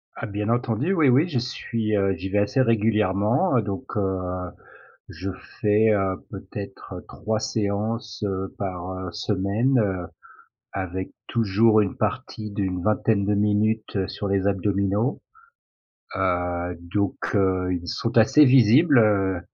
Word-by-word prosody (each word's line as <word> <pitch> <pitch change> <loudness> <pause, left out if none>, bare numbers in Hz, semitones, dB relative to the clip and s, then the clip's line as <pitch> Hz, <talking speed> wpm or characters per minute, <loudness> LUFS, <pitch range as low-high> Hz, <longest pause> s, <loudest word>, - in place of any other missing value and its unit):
Ah, - - -5
bien 105 0 -3
entendu, 120 - 0
oui, 155 -7 +4
oui. 140 +7 +4
J'y 135 -9 -1
suis, 115 -3 -2
heu 100 -1 +2
j'y 95 - -6
vais 105 - 0
assez 105 +6 +1
régulièrement, 110 - +2
heu, - - +3
donc 110 +5 -6
heu, 95 -2 0 0.9
je 95 +2 -5 0.3
fais, 105 +1 +3
heu, 95 -2 +1
peut-être, - - -8
heu, - - -9
3 110 +1 -3
séances, 110 +2 -2
heu, 95 0 -4
par, 90 -2 -4
heu, 95 -1 -6
semaine, 105 +8 0
heu, 95 -4 -1 0.7
avec 95 -1 -4 0.2
toujours 110 0 +3
une 100 - -2
partie 105 -1 -3
d'une 95 -3 -2
vingtaine 105 0 +1
de 105 - +1
minutes, 105 +1 0
heu, 95 -1 0
sur 100 - -5
les 100 0 +1
abdominaux. 100 +4 0 0.9
Heu 90 -2 -1 0.2
donc 100 -2 0 0.2
heu, 95 -2 +1
ils 90 -1 -4
sont 115 0 -1
assez 130 +7 +6
visibles, 135 +3 +5
heu, 95 -5 +2
105 Hz, 145 wpm, -24 LUFS, 95-115 Hz, 0.9 s, assez